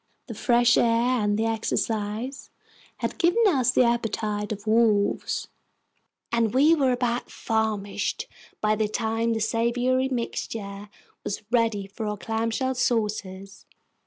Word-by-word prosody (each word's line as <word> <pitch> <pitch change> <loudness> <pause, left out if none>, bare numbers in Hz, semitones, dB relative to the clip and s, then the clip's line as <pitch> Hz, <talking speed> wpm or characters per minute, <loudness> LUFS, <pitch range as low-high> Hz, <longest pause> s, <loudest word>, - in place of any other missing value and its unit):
The - - -7
fresh 240 -1 +3
air 240 +1 +2
and 205 0 +1
the 220 - 0
exercise 220 +2 -2 0.5
had - - -4
given 370 +6 +3
us 265 - +3
the 255 - +4
appetites 220 -3 -1
of 205 0 -5
wolves, 215 -2 +2 0.8
and 235 0 +1
we 295 +5 +6
were 275 -5 +2
about 245 -1 -1
famished 220 - -2 0.4
by 215 0 +2
the 215 0 0
time 225 +1 -1
the 225 - -1
savory 245 +4 +1
mixture 210 -4 -4 0.3
was 200 - -4
ready 230 -4 +1
for 210 +3 -6
our 210 0 -3
clamshell 225 +5 -1
saucers. 210 -5 -2
225 Hz, 130 wpm, -25 LUFS, 210-245 Hz, 0.8 s, we